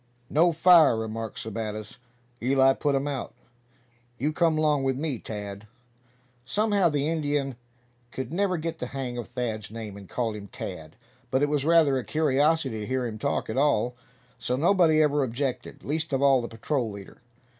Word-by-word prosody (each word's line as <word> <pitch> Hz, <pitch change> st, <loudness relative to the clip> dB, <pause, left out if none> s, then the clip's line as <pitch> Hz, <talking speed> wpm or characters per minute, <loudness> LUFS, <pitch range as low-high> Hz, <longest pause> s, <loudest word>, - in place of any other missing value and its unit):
"No 170 Hz, +4 st, +4 dB
fire," 165 Hz, -6 st, +6 dB
remarked 110 Hz, 0 st, -4 dB
Sebattis. 110 Hz, 0 st, -5 dB, 0.4 s
"Eli 135 Hz, +2 st, +4 dB
put 145 Hz, 0 st, 0 dB
um 135 Hz, +1 st, 0 dB
out. 140 Hz, -3 st, -4 dB, 0.8 s
You 150 Hz, +5 st, -1 dB
come 165 Hz, -1 st, +2 dB
'long 150 Hz, -2 st, +2 dB
with 135 Hz, -1 st, 0 dB
me, 145 Hz, -5 st, -2 dB
Tad!" 105 Hz, -1 st, -7 dB, 0.8 s
Somehow 205 Hz, -, +2 dB
the 145 Hz, -1 st, 0 dB
Indian 145 Hz, -4 st, -1 dB, 0.5 s
could 130 Hz, +3 st, -6 dB
never 185 Hz, 0 st, +1 dB
get 165 Hz, +1 st, -4 dB
the 125 Hz, -, -3 dB
hang 125 Hz, -2 st, -3 dB
of 120 Hz, -, -6 dB
Thad's 120 Hz, -4 st, -4 dB
name, 110 Hz, -2 st, -7 dB
and 100 Hz, -2 st, -12 dB
called 115 Hz, -3 st, -2 dB
him 100 Hz, -1 st, -8 dB
Tad; 80 Hz, -5 st, -8 dB, 0.3 s
but 130 Hz, +3 st, +1 dB
it 145 Hz, -, +2 dB
was 145 Hz, -2 st, 0 dB
rather 160 Hz, -5 st, +4 dB
a -, -, -5 dB
curiosity 145 Hz, -2 st, +1 dB
to 105 Hz, -, -5 dB
hear 130 Hz, -1 st, -1 dB
him 110 Hz, -2 st, -5 dB
talk -, -, -1 dB
at 110 Hz, -, -4 dB
all, 125 Hz, -4 st, +2 dB, 0.5 s
so 125 Hz, -, -1 dB
nobody 160 Hz, 0 st, +4 dB
ever 150 Hz, -1 st, +2 dB
objected, 125 Hz, 0 st, -4 dB
least 155 Hz, +2 st, -2 dB
of 135 Hz, -, +1 dB
all 135 Hz, -2 st, +5 dB
the 120 Hz, -, -4 dB
patrol 115 Hz, +2 st, -2 dB
leader. 100 Hz, +1 st, -11 dB
135 Hz, 175 wpm, -26 LUFS, 115-155 Hz, 0.8 s, fire